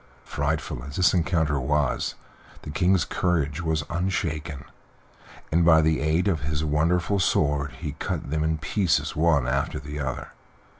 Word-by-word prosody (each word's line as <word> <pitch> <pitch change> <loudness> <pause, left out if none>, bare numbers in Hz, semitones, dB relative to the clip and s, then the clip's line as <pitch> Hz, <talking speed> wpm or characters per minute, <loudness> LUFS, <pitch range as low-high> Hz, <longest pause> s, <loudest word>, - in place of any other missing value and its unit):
Frightful 75 -4 -2
as 70 +1 -8
this 90 - +4
encounter 80 -5 +1
was 70 +2 0 0.5
the - - -6
King's 90 +2 +2
courage 80 -3 0
was 80 -3 0
unshaken, 80 -4 -2 0.9
and 85 +2 +3
by 80 -1 +6
the 80 0 +2
aid 80 +5 +1
of 90 -6 +1
his 75 +2 -2
wonderful 85 +6 +1
sword 70 -4 +1
he 75 -4 -5
cut - - -3
them 80 0 0
in 80 0 0
pieces 80 +3 0
one 75 -5 +3
after 70 +1 -1
the 75 +1 -7
other. 65 -3 -4
80 Hz, 150 wpm, -25 LUFS, 75-85 Hz, 0.9 s, by